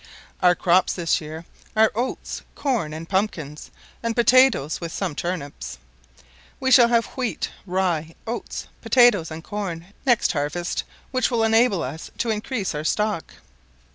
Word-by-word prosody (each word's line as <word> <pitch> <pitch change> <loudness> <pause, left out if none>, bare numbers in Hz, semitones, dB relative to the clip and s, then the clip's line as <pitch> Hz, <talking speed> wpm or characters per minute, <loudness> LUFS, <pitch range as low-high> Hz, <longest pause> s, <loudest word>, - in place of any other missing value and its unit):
Our 180 -1 +5
crops 180 +1 +3
this 170 -3 0
year 160 +2 -8 0.3
are 220 0 +5
oats, 245 +4 -3
corn, 240 - -1
and 160 +2 -7
pumpkins, 170 -7 -2 0.3
and 230 -1 -1
potatoes, 240 - +4
with 165 -1 -4
some 185 -3 -2
turnips. 145 - -5 0.8
We 260 0 0
shall 245 -2 +8
have 235 -1 +3
wheat, 250 -3 -2 0.2
rye, 175 -4 -1
oats, 235 +1 -5 0.2
potatoes, 240 -10 +4
and 160 0 -7
corn 190 -3 -5
next 245 -4 +3
harvest, 150 +4 -2 0.3
which 255 -1 +1
will 235 -3 +1
enable 225 -3 +3
us 145 +5 -6
to 230 - 0
increase 215 -2 -2
our 150 0 -3
stock. 210 +1 -1
190 Hz, 140 wpm, -23 LUFS, 165-230 Hz, 0.8 s, shall